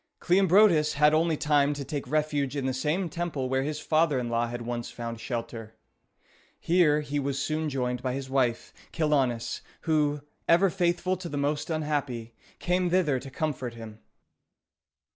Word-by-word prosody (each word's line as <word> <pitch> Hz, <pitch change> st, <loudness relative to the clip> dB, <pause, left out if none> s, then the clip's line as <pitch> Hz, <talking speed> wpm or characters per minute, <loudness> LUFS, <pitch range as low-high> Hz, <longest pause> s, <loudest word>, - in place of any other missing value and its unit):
Cleombrotus 180 Hz, -3 st, +4 dB
had 150 Hz, +1 st, +4 dB
only 160 Hz, 0 st, +2 dB
time 145 Hz, -1 st, +2 dB
to 140 Hz, -1 st, -5 dB
take 145 Hz, -1 st, -4 dB
refuge 150 Hz, -2 st, 0 dB
in 140 Hz, -2 st, -2 dB
the 130 Hz, -, 0 dB
same 155 Hz, +8 st, -1 dB
temple 165 Hz, -5 st, -3 dB
where 130 Hz, +1 st, 0 dB
his 150 Hz, +2 st, -3 dB
father 155 Hz, -1 st, +2 dB
in 120 Hz, -2 st, -2 dB
law 115 Hz, 0 st, 0 dB
had 120 Hz, 0 st, -5 dB
once 120 Hz, 0 st, -4 dB
found 115 Hz, -1 st, -6 dB
shelter. 115 Hz, -2 st, -5 dB, 0.8 s
Here 160 Hz, -4 st, +3 dB
he 145 Hz, 0 st, -2 dB
was 140 Hz, -1 st, -2 dB
soon 155 Hz, +2 st, -1 dB
joined 125 Hz, -3 st, -2 dB
by 130 Hz, -1 st, -2 dB
his 135 Hz, 0 st, -4 dB
wife, 130 Hz, -3 st, 0 dB, 0.2 s
Chilonis, 135 Hz, -7 st, 0 dB, 0.2 s
who, 150 Hz, -2 st, +1 dB, 0.3 s
ever 175 Hz, +3 st, +5 dB
faithful 180 Hz, 0 st, 0 dB
to 175 Hz, -1 st, -7 dB
the 145 Hz, -, -4 dB
most 145 Hz, +2 st, -1 dB
unhappy, 145 Hz, -7 st, -2 dB, 0.2 s
came 180 Hz, 0 st, 0 dB
thither 165 Hz, -7 st, +2 dB
to 135 Hz, -, -9 dB
comfort 130 Hz, -4 st, -3 dB
him. 110 Hz, -2 st, -10 dB
145 Hz, 160 wpm, -27 LUFS, 125-160 Hz, 0.8 s, ever